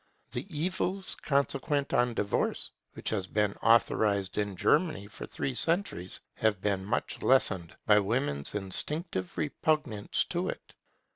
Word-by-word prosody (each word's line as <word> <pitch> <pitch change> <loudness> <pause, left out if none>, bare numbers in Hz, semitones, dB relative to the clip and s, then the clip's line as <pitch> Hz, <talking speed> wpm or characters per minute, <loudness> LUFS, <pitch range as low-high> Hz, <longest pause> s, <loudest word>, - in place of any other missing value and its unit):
The - - -4
evils 185 +4 -2
consequent 140 0 0
on 120 -1 +3
divorce, 100 -1 -1 0.2
which - - -4
has 100 -4 -1
been 105 -1 +1
authorized 105 -3 +3
in 100 -2 -1
Germany 150 - +2
for 100 - -9
three 135 - -2
centuries, 165 - -1
have 110 -3 +1
been 100 -1 0
much 105 +5 -2
lessened 95 -10 +2
by 105 -1 +6
women's 100 - -1
instinctive 100 - -3
repugnance 150 -7 0
to - - -1
it. - - -7
110 Hz, 130 wpm, -30 LUFS, 100-150 Hz, 0.2 s, by